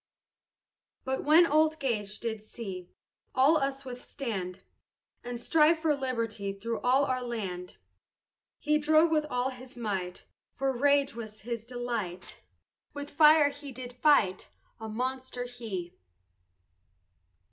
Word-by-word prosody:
But 265 0 -2
when 315 +4 +7
old 310 0 +3
Gage 215 -7 -2
did 220 -2 -3
see 195 -5 -8 0.5
All 280 +5 +5
us 275 -1 -2
withstand, 235 -7 -5 0.6
And 245 -1 -5
strive 305 +6 +4
for 315 -1 +1
liberty 230 -7 -2
Through 225 +3 -4
all 260 +3 +3
our 255 -1 -1
land, 195 -7 -5 0.8
He 300 0 +1
strove 315 +2 +4
with 305 -1 +2
all 250 +1 0
his 255 -1 -12
might, 190 -6 -3 0.2
For 270 -1 -2
rage 280 +2 +3
was 215 -2 -8
his 230 0 -5
delight, 235 -7 -5 0.5
With 285 0 -6
fire 300 0 +6
he 285 -1 -9
did 250 -1 -8
fight, 245 -8 +3 0.3
A 220 0 -6
monster 255 +2 -3
he. 225 -8 -6
250 Hz, 125 wpm, -29 LUFS, 220-285 Hz, 0.8 s, when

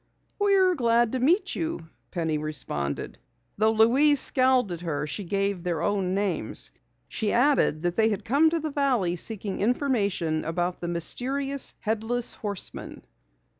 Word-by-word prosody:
"We're 390 -2 +3
glad 235 -5 +2
to 260 - -2
meet 330 - +2
you," 320 - -4 0.2
Penny 160 -3 -2
responded. 75 - -4 0.4
Though 220 +1 +4
Louise 260 +7 +4
scowled 255 -6 +4
at 170 -1 -5
her, 150 -4 -3
she 155 +7 -4
gave 195 0 -1
their 170 -2 -2
own 195 -2 0
names. 200 -3 0 0.4
She 215 -2 -2
added 245 - +2
that 175 0 -1
they 220 0 +4
had 205 -3 -3
come 290 +7 +4
to 330 +1 -1
the 310 -1 -4
valley 255 -11 +1
seeking 200 +1 -3
information 200 - 0
about 175 +2 -3
the 175 - -3
mysterious 270 - -1
Headless 225 +2 -1
Horseman. 205 -3 -5
215 Hz, 145 wpm, -26 LUFS, 175-260 Hz, 0.4 s, Though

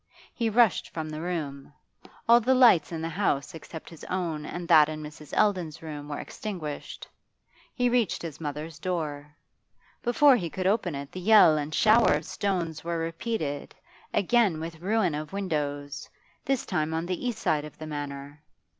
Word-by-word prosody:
He 230 -2 0
rushed 225 -2 +3
from 155 -1 -5
the 155 0 -5
room. 150 -6 -4 0.6
All 235 +1 +8
the 260 +3 +3
lights 235 - +6
in 160 -1 -4
the 165 - -2
house 165 -2 -1
except 160 0 -9
his 165 - -12
own 165 -5 -3
and 175 -1 -5
that 155 -3 +7
in 155 0 -5
Mrs. 150 0 -10
Eldon's 180 -7 +1
room 150 -2 -7
were 145 - -3
extinguished. 170 -9 -6 0.7
He 245 -1 +2
reached 240 -8 +1
his 160 -2 -7
mother's 150 +1 -5
door. 150 -5 -4 0.7
Before 275 +3 +5
he 170 -6 -3
could 185 +3 -4
open 190 -5 +1
it 140 0 -6
the 185 - -6
yell 205 -5 +7
and 150 0 -2
the - - -3
shower 220 +2 +5
of 150 +1 -3
stones 170 -6 -2
were 170 0 -2
repeated, 165 -2 -3 0.4
again 205 -4 +2
with 165 0 -6
ruin 195 -3 +1
of 150 +3 -5
windows, 145 -7 -3 0.4
this 270 -2 0
time 160 -3 -1
on 165 +1 -1
the 180 +5 -3
east 240 -3 -2
side 150 -8 0
of 150 - -10
the 155 - -7
Manor. 145 -1 -6
165 Hz, 175 wpm, -27 LUFS, 150-200 Hz, 0.7 s, All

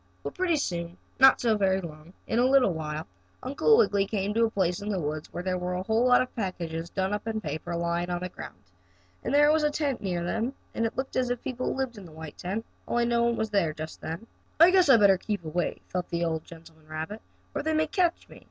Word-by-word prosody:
Well, - - -4
pretty 360 -2 +1
soon, 175 - -3 0.2
not 265 0 +8
so 230 -2 +2
very 190 -1 +2
long, 160 -2 -9
in 230 - 0
a 245 - +4
little 260 -7 +4
while, 155 -1 -4 0.4
Uncle 285 - +4
Wiggily 200 - +3
came 205 -1 -1
to 230 +1 +3
a - - 0
place 180 -4 0
in 205 - -4
the 195 -3 0
woods 155 -1 -4
where 175 - -5
there 185 -1 -1
were 180 0 -2
a 180 - -2
whole 225 +5 +2
lot 250 0 +6
of 255 - -11
packages 170 -6 -4
done 190 +2 -1
up 210 +2 -3
in 220 -1 -1
paper 160 -1 -4
lying 170 +1 -1
on 175 0 -2
the 180 - -3
ground. 165 - -9 0.7
And - - -2
there 295 +1 +6
was 315 0 +3
a 300 - +3
tent 290 -3 -1
near 180 -3 -2
them, 225 +8 -1 0.2
and 230 - +1
it 225 - -9
looked 265 +1 -3
as 255 -1 +1
if 245 -1 -3
people 255 -1 -2
lived 260 -4 -3
in 195 - -11
the - - -14
white 160 -1 -10
tent, 205 +6 -3 0.2
only 240 0 +1
no 235 0 +2
one 235 0 +2
was 220 -1 -2
there 170 -7 +1
just 155 +1 -7
then. 165 +8 -5 0.3
"I 335 +3 +8
guess 370 -5 +5
I'd 235 -5 +7
better 195 -2 +6
keep 205 -5 -3
away," 170 +3 -2
thought 180 -1 -3
the 170 0 -1
old 160 -1 -2
gentleman 160 -2 -15
rabbit, 160 +8 -5 0.3
"or - - -1
they 315 +1 0
may 315 0 +3
catch 345 +1 0
me." - - -14
200 Hz, 250 wpm, -27 LUFS, 170-245 Hz, 0.7 s, not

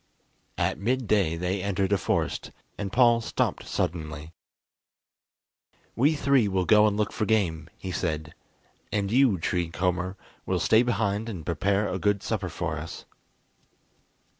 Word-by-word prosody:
At - - 0
midday 105 -6 +1
they 90 +3 -2
entered 100 0 0
a - - +4
forest, - - -1 0.3
and 100 -2 -4
Paul 120 -1 +5
stopped - - -2
suddenly. 80 -1 -3 1.6
"We 145 +6 +3
three 140 -5 +3
will 95 -2 0
go 105 +2 +6
and 105 -1 0
look 105 -1 0
for 110 - -1
game," 85 -7 0
he 95 - -6
said, 80 -3 -3 0.6
"and 100 -1 -1
you, 125 -5 +4
Tree 85 0 -1
Comber, 90 +3 -1 0.3
will - - -1
stay 110 - +4
behind 110 -2 0
and 90 -8 -6
prepare 100 +5 +1
a 95 - -3
good 100 +2 +1
supper 100 -5 -2
for 80 -2 -3
us." 80 +2 -8
100 Hz, 140 wpm, -27 LUFS, 85-110 Hz, 1.6 s, go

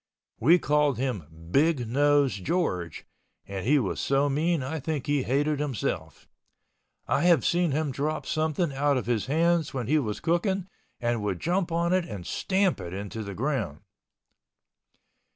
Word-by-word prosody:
We 160 +10 +6
called 150 -5 +2
him 120 - -2 0.2
"Big 140 - +2
Nose 145 +2 +3
George" 90 - -2 0.4
and 95 -1 -5
he 150 +3 +5
was 110 -9 -1
so 140 +1 +2
mean 155 +1 +1
I 155 +5 -3
think 150 -1 -3
he 145 -1 +1
hated 145 +4 0
himself. 145 -6 -3 0.8
I - - +1
have 175 -2 +4
seen 175 0 +2
him 150 0 0
drop 150 +4 -2
something 155 0 0
out 140 0 +2
of 125 - -2
his 115 -2 -1
hands 165 +1 +1
when 125 -3 -2
he 150 +6 +3
was 105 -7 -3
cooking 180 +3 0 0.3
and 120 -2 0
would 100 -4 -2
jump 175 0 0
on 170 +1 +1
it 185 -2 +2
and 100 - -7
stamp 190 - 0
it 90 -1 -6
in 100 +1 -5
the 100 -3 -6
ground. 120 - -2
145 Hz, 160 wpm, -27 LUFS, 120-160 Hz, 0.8 s, We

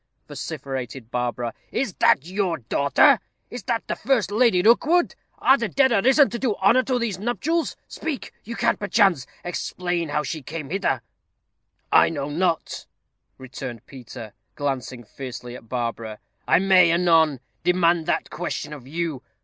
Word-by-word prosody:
vociferated 130 -3 -6
Barbara, 120 -1 -2 0.2
"is 250 -6 -1
that 135 - +4
your 185 -2 -1
daughter 140 - +3 0.3
is 245 - -6
that 230 - -2
the - - -1
first 225 -6 0
Lady 215 -5 +3
Rookwood? 310 - +4 0.2
Are 270 +1 +4
the 230 -3 -1
dead 265 +7 +3
arisen 265 +7 +5
to 235 - -4
do 240 -6 0
honor 215 +7 +4
to 255 -1 -1
these 225 -6 -2
nuptials? 295 - -1
Speak! 315 -5 -5
you 230 +2 -7
can, - - +1
perchance, 195 - +2 0.2
explain 175 -1 -3
how 150 +1 0
she 155 0 -4
came 150 +1 -7
hither." 185 -10 0 0.9
"I - - +6
know 145 -3 -4
not," 170 +1 -1 0.5
returned 130 -3 -8
Peter, 120 -4 -10 0.2
glancing 130 -3 -3
fiercely 125 0 -8
at 115 -3 -13
Barbara; 115 -3 -3 0.3
"I - - +5
may, 185 -2 +5
anon, 165 -5 +3 0.2
demand 175 -2 +2
that - - -1
question 150 -2 -4
of 135 -4 -11
you. 160 -3 -3
170 Hz, 150 wpm, -23 LUFS, 135-220 Hz, 0.9 s, I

